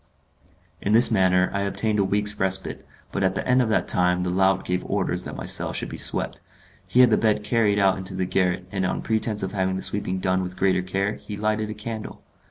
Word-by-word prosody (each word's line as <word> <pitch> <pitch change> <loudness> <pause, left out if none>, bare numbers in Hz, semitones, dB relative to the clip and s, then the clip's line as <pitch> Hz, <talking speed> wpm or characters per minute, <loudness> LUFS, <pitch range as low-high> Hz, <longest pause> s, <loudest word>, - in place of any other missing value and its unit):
In 105 - 0
this 120 +2 +7
manner 95 -3 +3
I 100 - -1
obtained 105 +2 -1
a - - +3
week's 105 +2 0
respite, 95 0 -1 0.3
but - - -3
at 95 -1 +1
the - - -3
end 130 0 +4
of 120 - 0
that 110 - +1
time 90 0 +2
the 90 - -2
lout 95 +1 +2
gave 90 0 -1
orders - - -1
that - - -7
my - - -6
cell - - +1
should - - -2
be - - -7
swept. - - 0 0.5
He 120 +8 +4
had 125 -2 +5
the 110 - +4
bed 105 -1 +1
carried 105 -2 +1
out 95 -1 +2
into 95 0 -4
the 95 0 -1
garret, 90 0 0
and 95 -1 -2
on 95 - -2
pretence 110 -2 -1
of 95 - -3
having 95 -2 -1
the 95 - -4
sweeping 95 -2 -2
done 95 0 0
with 90 0 -6
greater 95 -1 +2
care, 95 +3 -2
he 105 - -8
lighted 110 0 -1
a 110 - -5
candle. 110 +1 -7
95 Hz, 235 wpm, -24 LUFS, 95-105 Hz, 0.5 s, this